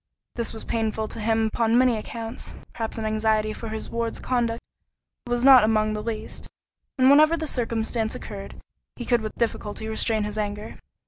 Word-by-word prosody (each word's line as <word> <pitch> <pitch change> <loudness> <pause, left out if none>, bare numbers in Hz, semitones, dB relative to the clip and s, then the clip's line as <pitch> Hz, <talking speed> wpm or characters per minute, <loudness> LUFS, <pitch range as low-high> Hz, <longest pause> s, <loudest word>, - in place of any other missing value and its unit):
This 235 -2 -3
was 220 - -6
painful 220 -1 -1
to 230 - -7
him 225 +1 +2
upon 230 0 +2
many 250 -1 +4
accounts; 225 +1 -6 0.2
perhaps 225 0 -4
an 220 - -3
anxiety 215 0 +1
for 225 +1 -7
his 220 0 -5
ward's 230 -1 -3
conduct 235 -2 0 0.7
was 240 0 0
not 265 -3 +9
among 215 0 +2
the 210 - -3
least; 220 -1 -5 0.5
and 260 0 +5
whenever 310 +3 +6
the 320 - -3
circumstance 230 -4 -1
occurred, 200 -2 -8 0.4
he 240 - -6
could 240 -1 +2
with 215 -1 -5
difficulty 220 -1 -2
restrain 220 0 0
his 210 +1 -4
anger. 210 0 -4
225 Hz, 175 wpm, -25 LUFS, 215-235 Hz, 0.7 s, not